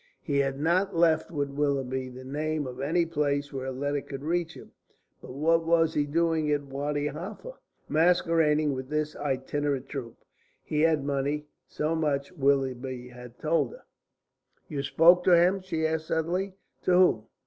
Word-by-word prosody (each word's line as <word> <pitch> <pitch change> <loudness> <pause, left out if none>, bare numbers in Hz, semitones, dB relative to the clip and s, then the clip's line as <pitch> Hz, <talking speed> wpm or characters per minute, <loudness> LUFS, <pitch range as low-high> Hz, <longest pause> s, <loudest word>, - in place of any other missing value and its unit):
He 140 -2 0
had 135 0 0
not 180 +5 +1
left 165 -1 +3
with 145 -4 -2
Willoughby 135 -2 -1
the 130 +1 -10
name 150 +2 -2
of 125 0 -7
any 165 +5 +1
place 145 -3 -1
where 130 -1 -4
a - - -2
letter 145 +2 -2
could 135 0 -8
reach 165 +1 -1
him. - - -13 0.5
But 125 - -10
what 165 +4 +2
was 165 -1 +3
he 145 -1 0
doing 160 0 +1
at 145 -1 +1
Wadi 145 +1 -3
Halfa, 190 - -6 0.3
masquerading 160 -3 +3
with 130 0 -6
this 150 0 -1
itinerant 140 0 -2
troupe? 120 -5 -6 0.5
He 150 -1 -1
had 160 -3 +3
money; 145 +1 -1 0.2
so 155 +2 -1
much 140 -3 -1
Willoughby 130 -2 -1
had 125 0 -12
told 165 - 0
her. - - -14 0.8
"You 145 -3 -3
spoke 170 +6 +5
to 180 -2 +7
him?" 185 +3 +3
she 165 -4 -2
asked 160 0 -1
suddenly. 180 +4 -1 0.3
"To - - 0
whom? 180 -12 +4
150 Hz, 165 wpm, -28 LUFS, 140-165 Hz, 0.8 s, to